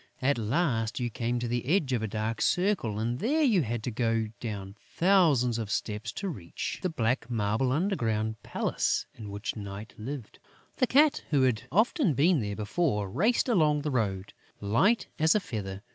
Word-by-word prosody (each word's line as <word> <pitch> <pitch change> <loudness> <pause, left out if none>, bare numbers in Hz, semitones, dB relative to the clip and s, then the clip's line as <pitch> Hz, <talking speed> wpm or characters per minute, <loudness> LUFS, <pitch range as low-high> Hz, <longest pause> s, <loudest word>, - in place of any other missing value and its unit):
At 135 -1 +1
last, 115 -1 0
you 120 -1 -2
came 120 +2 -1
to 120 0 -2
the 120 0 -1
edge 150 -5 +2
of 120 - +1
a 110 - -1
dark 110 +2 -3
circle; 180 - +1
and 115 +3 -1
there 295 - +1
you 220 - +4
had 120 -3 -3
to 125 - -2
go 115 -1 0
down 100 -4 -5
thousands 155 - +3
of 110 -3 -4
steps 105 +1 -3
to 200 - -4
reach 95 - -5
the 185 - 0
black 120 -5 -1
marble 110 +2 0
underground 115 - 0
palace - - -1
in 110 -3 -9
which 100 +2 -4
Night 100 +1 -7
lived. 125 0 -7 0.4
The 255 - +3
Cat, 295 +4 +4
who 140 -4 +3
had 125 -1 +1
often 215 - +2
been 160 +4 +4
there 105 -1 -3
before, 105 - -1
raced 225 - +2
along 155 - +3
the 150 - -1
road, 100 -6 -1 0.3
light 130 - +2
as 160 +3 +4
a - - +4
feather. 100 - -6
120 Hz, 180 wpm, -28 LUFS, 110-165 Hz, 0.4 s, you